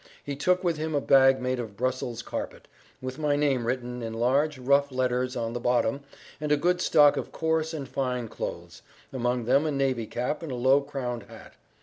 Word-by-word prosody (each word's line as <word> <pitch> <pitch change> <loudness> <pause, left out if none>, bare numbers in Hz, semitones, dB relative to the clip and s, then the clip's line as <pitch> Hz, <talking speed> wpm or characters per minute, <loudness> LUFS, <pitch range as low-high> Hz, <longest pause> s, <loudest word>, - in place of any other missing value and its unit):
He 145 - -4
took 180 +6 +1
with 170 -3 +1
him 155 0 -2
a - - +3
bag 135 -1 +5
made 125 0 -1
of 110 -4 -6
Brussels 125 -1 -2
carpet, - - -6 0.4
with 130 +2 -5
my 150 -2 +1
name 135 -5 +1
written 125 0 -3
in 115 -1 -5
large, 140 +6 +1
rough 140 +2 +2
letters 125 0 0
on 115 -1 -2
the 120 - -3
bottom, 120 +1 +1 0.4
and 150 0 -2
a 150 - +5
good 175 +4 +1
stock 150 -4 +5
of - - -4
coarse 160 0 0
and 145 -4 -5
fine 125 -3 -2
clothes, - - -7 0.3
among 125 -2 -1
them 135 +5 +4
a - - 0
navy 135 -5 0
cap 125 +7 -3
and 165 -4 -6
a - - -3
low 130 +3 +4
crowned 125 -6 -5
hat. - - -13
130 Hz, 205 wpm, -27 LUFS, 125-145 Hz, 0.4 s, bag